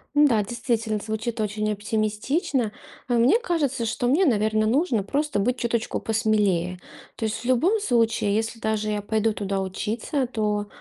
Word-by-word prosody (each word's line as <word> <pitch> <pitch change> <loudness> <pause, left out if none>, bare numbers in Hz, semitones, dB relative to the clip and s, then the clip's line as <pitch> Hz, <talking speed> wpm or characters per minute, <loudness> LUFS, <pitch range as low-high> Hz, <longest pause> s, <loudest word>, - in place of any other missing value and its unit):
Н-да, 275 -8 +5
действительно, 225 -1 -1
звучит 220 +2 -4
очень 215 0 -1
оптимистично. 215 - -1 0.4
А 245 - 0
мне 240 - +4
кажется, 290 - -1
что 235 +2 -1
мне, 310 +10 +4
наверно, 215 -4 +2
нужно 240 - +1
просто 285 +2 -1
быть 245 +5 +1
чуточку 235 -2 -1
посмелее. 205 -5 +1 0.4
То 225 - -3
есть, 220 - -1
в - - -10
любом 320 - +3
случае, 230 - +1
если 225 +1 -2
даже 215 -1 -1
я 210 -1 -1
пойду 220 +1 0
туда 195 -1 -2
учиться, 220 +8 -2
то, 210 -3 -1
220 Hz, 155 wpm, -24 LUFS, 210-245 Hz, 0.4 s, Н-да